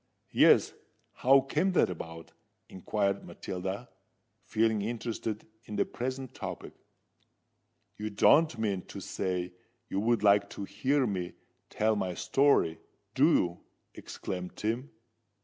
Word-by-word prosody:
"Yes:—how 135 +2 +3
came 155 +8 0
that 160 - +3
about?" 80 -1 -8 0.4
inquired 100 +1 -1
Matilda, 95 +6 -5 0.5
feeling 110 -1 +1
interested 110 -1 -3 0.2
in 105 - -6
the - - +2
present 130 +1 -5
topic. - - -7 1.3
"You 105 0 -3
don't 150 +8 +4
mean 100 -4 -1
to - - -8
say 90 -1 -3 0.4
you 95 - -1
would 115 +1 +1
like 100 -1 +5
to - - -4
hear 135 +6 +1
me 95 -5 -3 0.4
tell 110 +1 +1
my 95 -3 -2
story, 135 - +2 0.3
do - - +5
you?" 85 -1 +1 0.3
exclaimed 90 -1 -6
Tim. 115 +6 -2
105 Hz, 115 wpm, -30 LUFS, 95-125 Hz, 1.3 s, like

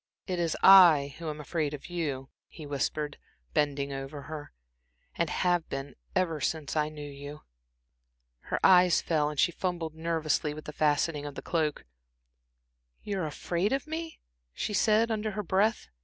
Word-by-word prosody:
"It 180 -2 -2
is 170 -2 0
I 165 -8 +8
who 165 -2 -4
am 150 0 -6
afraid 150 0 -2
of 140 - -12
you," 145 -7 -3 0.2
he 155 - -11
whispered, 145 +1 -2 0.3
bending 140 -1 0
over 135 +1 -6
her, 150 +1 -8 0.6
"and 170 -2 -1
have 175 -2 +1
been 135 0 -5 0.2
ever 165 -5 0
since 155 +2 -2
I 150 -1 +1
knew 150 -1 -8
you." 145 +1 -9 1.0
Her - - -3
eyes 180 -2 +6
fell, 150 -3 +1
and 150 -2 -6
she - - +4
fumbled 175 -3 -3
nervously 160 -2 -1
with 155 - -9
the 150 - -7
fastening 150 0 +1
of 145 - -8
the - - -7
cloak. 155 -3 -1
"Ah, - - -49
you 200 -1 -3
were 165 - -1
afraid 175 +6 -1
of 270 0 0
me?" 320 +1 -5 0.4
she 210 - -3
said, 220 +2 +3
under 215 0 -1
her 210 - -1
breath. 205 +5 +1
155 Hz, 170 wpm, -29 LUFS, 140-175 Hz, 1.0 s, I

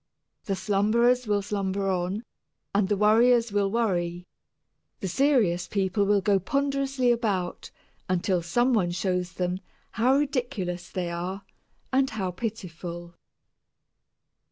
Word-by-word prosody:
The 195 - -1
slumberers 220 +6 +2
will 205 -1 +1
slumber 195 -1 -2
on, 185 +3 -1 0.5
and 200 -1 +2
the 205 - +1
worriers 230 +2 +4
will 200 -1 +1
worry, 180 -6 -1 0.7
the 195 - -3
serious 195 -7 +2
people 200 +1 0
will 205 -1 +3
go 200 0 +3
ponderously 275 +2 0
about 205 -7 -1 0.4
until 185 0 +1
some 240 +10 +1
one 190 -6 +2
shows 180 0 -1
them 180 0 -2 0.3
how 250 +4 +3
ridiculous 245 -11 -2
they 175 -2 -3
are 180 +3 -4 0.5
and 265 0 +3
how 195 -4 -3
pitiful. 175 -5 -6
200 Hz, 120 wpm, -26 LUFS, 180-235 Hz, 0.7 s, worriers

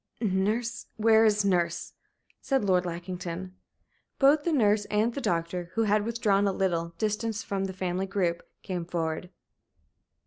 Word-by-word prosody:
"Nurse 220 +3 -1
where 220 0 +5
is 210 -1 +3
nurse?" 170 -3 0 0.5
said 270 -6 0
Lord 180 -2 +2
Lackington. 180 +1 -5 0.6
Both 285 +2 +5
the 340 - +2
nurse 210 -7 +3
and 215 +3 +1
the 280 - -4
doctor, 170 -2 -1
who 225 - +2
had 210 0 +2
withdrawn 215 -4 +2
a - - +2
little 170 -3 -1
distance 215 0 -1
from 195 -1 -2
the 190 - -4
family 185 +1 -2
group, 180 -3 0 0.2
came 180 -4 -3
forward. 165 0 -3
195 Hz, 145 wpm, -28 LUFS, 175-220 Hz, 0.6 s, where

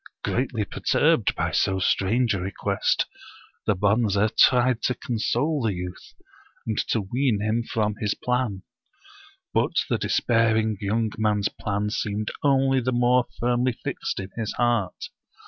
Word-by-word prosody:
'* - - -63
Greatly 120 -4 -1
perturbed - - +1
by - - -1
so 95 - +1
strange 110 +5 +1
a 100 - -2
request, 95 +2 0 0.6
the 105 - +3
Bonze 100 +1 +2 0.2
tried 125 -1 +4
to 125 - 0
console 130 +6 -1
the 110 -5 0
youth, 90 0 -8 0.5
and 110 -2 -1
to 115 - +1
ween 120 +2 0
him 110 +3 0
from 110 -2 -1
his 105 -1 -1
plan. 125 -6 -2 0.9
But - - +1 0.2
the - - +1
despairing 110 -2 +1
young 110 +2 0
man's 105 -2 +1
plan 105 0 -3
seemed 105 0 -2
only 135 -2 +3
the 130 +1 -1
more 125 0 +3
firmly 125 +1 +1
fixed - - -4
in 95 0 -6
his 115 -3 -3
heart. 120 -6 -1
110 Hz, 145 wpm, -25 LUFS, 105-125 Hz, 0.9 s, tried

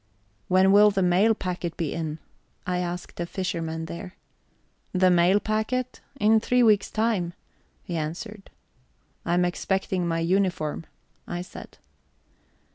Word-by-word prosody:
"When 185 +1 +4
will 205 +1 +7
the 195 -2 0
mail 190 +5 +4
packet 180 -3 -4
be 165 -5 -2
in?" 160 -2 -3 0.5
I 180 0 -1
asked 175 0 -5
a 170 - -2
fisherman 165 -4 -3
there. 180 +3 -8 0.8
"The 185 -1 +4
mail 180 +3 +4
packet? 220 +4 -2 0.2
In 220 0 +5
three 250 +2 +2
weeks' 210 -3 +4
time," 215 -6 0 0.5
he 175 - -5
answered. 180 +7 -5 0.8
"I 170 - +2
am 180 0 +3
expecting 185 0 -1
my 165 -1 0
uniform," 170 -3 0 0.4
I 175 0 -4
said. - - -12
180 Hz, 130 wpm, -25 LUFS, 170-205 Hz, 0.8 s, will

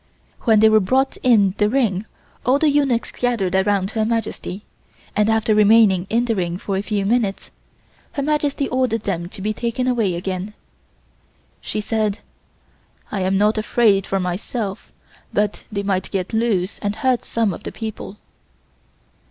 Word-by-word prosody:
When 220 -3 +5
they 220 - +7
were 215 0 +5
brought 260 +7 +1
in 210 -7 +4
the 210 0 +3
ring 220 -5 0 0.4
all 255 +2 +3
the 300 0 +3
eunuchs 275 -5 +1
gathered 230 -7 -1
around 190 0 +1
Her 220 -1 0
Majesty, 220 -3 -3 0.5
and 210 +1 +2
after 220 0 +2
remaining 210 -3 +5
in 235 +2 +1
the 230 -2 0
ring 175 -2 -2
for 195 +1 -3
a 190 - 0
few 205 -1 -2
minutes 215 -2 0 0.6
Her 280 - -2
Majesty 290 -1 0
ordered 250 -4 0
them 175 -3 -3
to 195 -1 -8
be 215 +1 0
taken 235 +3 -2
away 230 -8 +1
again. 185 +3 -4 1.1
She 215 - -3
said: 215 -1 -1 0.9
"I 200 - -2
am 190 +1 +1
not 210 +2 +2
afraid 215 -3 +2
for 195 - 0
myself, 195 +3 -4 0.4
but 210 0 0
they 200 -1 -2
might 195 -2 -1
get 190 +1 -3
loose 220 -4 0
and 205 0 -2
hurt 260 -2 +1
some 225 -4 0
of 170 - -8
the - - -6
people." 220 -2 -7
215 Hz, 160 wpm, -21 LUFS, 195-235 Hz, 1.1 s, they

